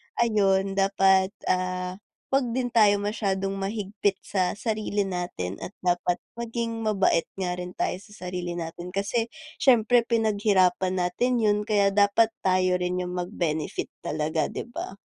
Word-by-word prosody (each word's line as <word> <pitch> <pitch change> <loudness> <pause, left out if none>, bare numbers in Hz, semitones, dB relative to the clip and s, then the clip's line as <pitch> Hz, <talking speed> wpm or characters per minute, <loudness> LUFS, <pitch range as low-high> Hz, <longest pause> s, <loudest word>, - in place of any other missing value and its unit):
ayun, 195 -4 +2
dapat, 195 0 +3 0.2
ah, 185 0 -2 0.3
huwag 270 -3 +2
din 255 -1 0
tayo 205 -3 +5
masyadong 195 -2 -1
mahigpit 200 -1 -1
sa 185 -3 0
sarili 215 -2 -1
natin, 175 - -4
at 200 - -8
dapat 180 0 +1 0.2
maging 230 -1 -3
mabait 195 -5 +2
nga 185 -2 -2
rin 180 0 -6
tayo - - -1
sa 205 -2 -11
sarili 180 -1 -4
natin 175 +2 -6
kasi, 215 +4 0 0.3
siyempre 240 -2 +4
pinaghirapan 200 -5 +2
natin 240 +6 +1
'yon, 210 -1 +3
kaya 200 -2 +3
dapat 205 +3 +4
tayo 185 -1 +2
rin 180 0 -1
yung 180 - -5
mag-benefit 175 -4 -2
talaga, 155 0 -1
'di - - -5
ba? 200 -4 -6
195 Hz, 140 wpm, -26 LUFS, 180-215 Hz, 0.3 s, tayo